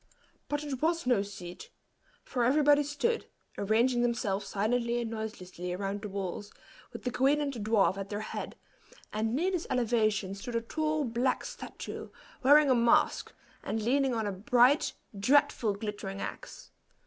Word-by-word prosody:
But 290 0 -1
it 275 -4 -4
was 335 0 +1
no 245 -5 +3
seat; 185 -3 -8 0.5
for 245 - -1
everybody 290 +3 +5
stood, 295 +12 -1 0.3
arranging 235 +4 +2
themselves 225 -5 0
silently 235 +3 0
and 230 -1 -3
noiselessly 185 -5 -5
around 195 +2 -3
the 210 - -5
walls, 195 +1 -5 0.4
with - - -9
the 250 - -1
queen 270 +4 +3
and 285 -2 -1
the 240 - -6
dwarf 205 -2 +2
at 195 0 -5
their 205 0 -3
head, 215 - -5 0.6
and 220 +2 0
near 355 +7 +1
this 355 -3 -2
elevation 215 -5 +1
stood 230 +5 -6
a 230 - +1
tall, 310 +5 -1
black 245 +1 0
statue, - - -7 0.3
wearing 285 +1 +6
a - - +7
mask, 235 -1 +3 0.3
and 220 0 -3
leaning 265 +2 +2
on 220 -1 -1
a 205 - -1
bright, 245 +8 +3 0.3
dreadful, 235 -2 +3
glittering 205 -2 -5
axe. - - -7
235 Hz, 160 wpm, -30 LUFS, 205-275 Hz, 0.6 s, a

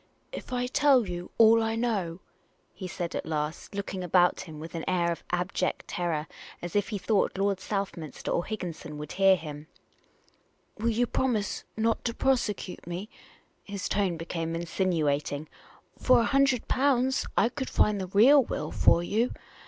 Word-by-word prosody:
" - - -42
If - - -8
I 250 0 0
tell 255 -3 +4
you 175 0 -5
all 225 0 +7
I 225 0 0
know," 200 -7 -1 0.5
he 185 - -7
said, 175 0 -4
at - - -2
last, 155 +4 -4
looking 195 -2 -4
about 180 0 +3
him 155 -3 -9
with 160 +1 -8
an 165 -1 -4
air 170 -2 +1
of 170 - -5
abject 180 +1 -1
terror, 165 -4 -2 0.3
as 175 +1 -7
if 205 -1 +1
he 210 - -2
thought 200 0 +1
Lord 195 -1 +1
South 195 0 -3
minster 155 -5 -6
or 170 - +1
Higginson 170 -7 -6
would 150 0 -7
hear 195 +1 +5
him, 150 -3 -8 0.5
" - - -39
will 230 +2 +1
you 235 +2 +2
promise 235 -4 -1
not 225 +1 +1
to 230 -1 -1
prosecute 210 -10 -1
me?" 180 +5 -5 0.5
His 200 -2 -4
tone 195 -4 0
became 165 0 -3
insinuating. 155 -4 -1 0.3
" - - -31
For 255 -2 +5
a - - +1
hundred 270 -3 +3
pounds 260 -1 +2
I 230 - +4
could 265 +1 -5
find 210 -2 +2
the 185 - -4
real 240 +10 +6
will - - -4
for 170 - +4
you. 225 +7 0
195 Hz, 175 wpm, -28 LUFS, 170-230 Hz, 0.5 s, all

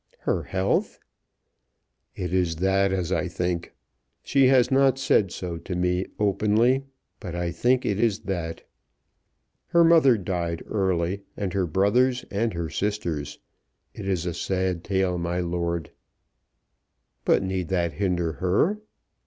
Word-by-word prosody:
"Her - - 0
health!" 95 +1 -1 1.2
"It 90 -1 -4
is 90 -3 +1
that 95 +3 +2
as 90 -3 -1
I - - 0
think. 90 -1 -3 0.5
She 135 -1 +4
has 130 -1 +4
not 135 -1 +4
said 105 -8 +2
so 85 -2 -5
to 90 +2 -5
me 90 +1 0
openly; 110 +6 +2 0.3
but 90 -6 -6
I 85 0 -2
think 125 +9 +1
it 100 0 0
is 115 -3 +1
that. 85 -4 -4 1.0
Her 170 -1 +4
mother 160 -7 +6
died 85 -3 -3
early, 95 -1 -1 0.2
and 95 -3 -3
her 95 -2 0
brothers 125 - +2
and 110 +3 0
her 85 -1 -2
sisters. 90 -8 -2 0.6
It 100 - -7
is 90 -3 -1
a 90 - -2
sad 90 0 -1
tale, 95 -2 0
my 85 +1 -2
lord." 85 -1 -2 1.3
"But - - +3
need 95 -2 -2
that 85 -2 0
hinder 90 -4 0
her?" 105 - +2
95 Hz, 135 wpm, -25 LUFS, 85-105 Hz, 1.3 s, mother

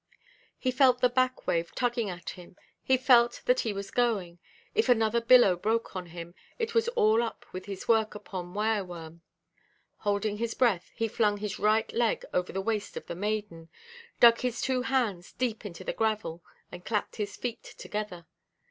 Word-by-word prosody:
He 255 - 0
felt 255 -1 +4
the 250 0 +4
back–wave 245 -9 0
tugging 240 -4 0
at 180 -1 -6
him, 180 -1 -13 0.3
he 260 - +3
felt 245 -2 +4
that 250 +1 +3
he 225 - 0
was 200 -1 -6
going; 200 -8 0 0.3
if 440 - +1
another 230 -1 +3
billow 230 -5 +6
broke 220 +4 -1
on 180 -1 -4
him, 170 0 -9 0.2
it 460 -1 -2
was 460 0 +2
all 220 +2 +4
up 235 - -5
with 185 +1 -6
his 195 -1 -7
work 220 -2 +2
upon 180 -3 -7
wire–worm. 180 -7 -2 0.8
Holding 205 0 -1
his 230 0 -2
breath, 220 -9 +2
he 225 - 0
flung 210 -1 +1
his 210 0 -4
right 215 +2 +2
leg 235 -1 +1
over 180 0 0
the 195 - -2
waist 210 0 -2
of - - -6
the - - -5
maiden, 200 -4 -3 0.5
dug 235 -1 +7
his 245 -2 -2
two 260 -1 0
hands 230 -9 -1
deep 230 -4 -2
into 180 -1 -9
the - - -3
gravel, 215 -7 -1 0.3
and 180 - -9
clapped 210 0 -2
his 205 -2 -4
feet 235 -2 -4
together. 205 -5 -6
215 Hz, 175 wpm, -29 LUFS, 185-240 Hz, 0.8 s, dug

